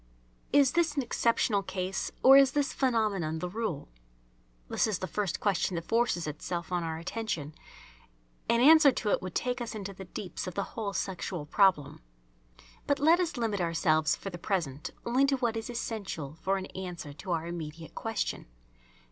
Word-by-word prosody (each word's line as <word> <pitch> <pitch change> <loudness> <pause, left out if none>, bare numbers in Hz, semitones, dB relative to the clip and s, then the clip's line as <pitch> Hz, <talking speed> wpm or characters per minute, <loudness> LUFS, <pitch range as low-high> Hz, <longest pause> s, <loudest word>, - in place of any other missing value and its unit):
Is 280 -2 +5
this 335 -3 +1
an 280 - +1
exceptional 230 -3 +1
case, 190 0 -3
or 265 +1 +9
is 275 -1 +6
this 290 -1 0
phenomenon 210 - 0
the 180 - -3
rule? 190 -6 -3 0.8
This - - +1
is 210 -4 0
the - - -4
first 195 -2 -2
question 195 -2 0
that 165 0 -4
forces 230 -7 +1
itself 165 +3 -4
on 175 -1 0
our 160 -1 -3
attention. 170 -4 -4 1.0
An 235 - +4
answer 300 +1 +8
to 210 - -1
it - - +2
would 185 -1 -7
take 250 0 -1
us 230 -2 -5
into 200 -2 -5
the 190 0 -9
deeps 180 +1 -6
of 180 - -6
the 200 - 0
whole 210 -3 -3
sexual 180 -4 -3
problem. 150 -4 +2 0.9
But 285 - +2
let 320 +5 +5
us 340 -6 -1
limit 220 -5 -1
ourselves 160 -2 +2
for 195 - -7
the 175 - -7
present 160 -7 -2 0.2
only 255 +4 +3
to 275 -1 +2
what 240 -3 0
is 225 0 -4
essential 205 - -4
for 195 +1 +1
an 190 - -4
answer 175 -6 -6
to 150 +6 -10
our 165 -1 -1
immediate 165 -1 -7
question. 225 - -3
195 Hz, 180 wpm, -30 LUFS, 170-235 Hz, 1.0 s, or